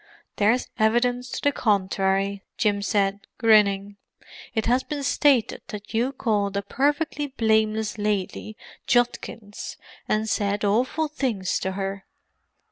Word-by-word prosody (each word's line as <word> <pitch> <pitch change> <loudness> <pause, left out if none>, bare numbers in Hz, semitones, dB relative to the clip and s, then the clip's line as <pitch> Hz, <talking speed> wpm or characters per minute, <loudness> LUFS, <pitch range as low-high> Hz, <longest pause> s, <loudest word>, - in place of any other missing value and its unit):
"There's 220 +5 +2
evidence 245 +3 +2
to - - -5
the 285 - +4
contrary," 195 -3 +1 0.2
Jim 205 -2 +1
said, 200 -1 0
grinning. 205 -3 +3 0.6
"It 220 - 0
has 250 +2 +3
been 290 0 -5
stated 265 -2 +2
that 210 +1 -8
you 240 +4 +1
called 205 -7 0
a 200 - -1
perfectly 290 +5 0
blameless 220 -4 +1
lady 210 +1 -2 0.3
Judkins, 235 -3 -1 0.3
and 215 +1 +1
said 205 -1 0
awful 255 +10 +1
things 245 - -1
to 190 - -2
her." 195 0 -4
215 Hz, 125 wpm, -24 LUFS, 200-245 Hz, 0.6 s, the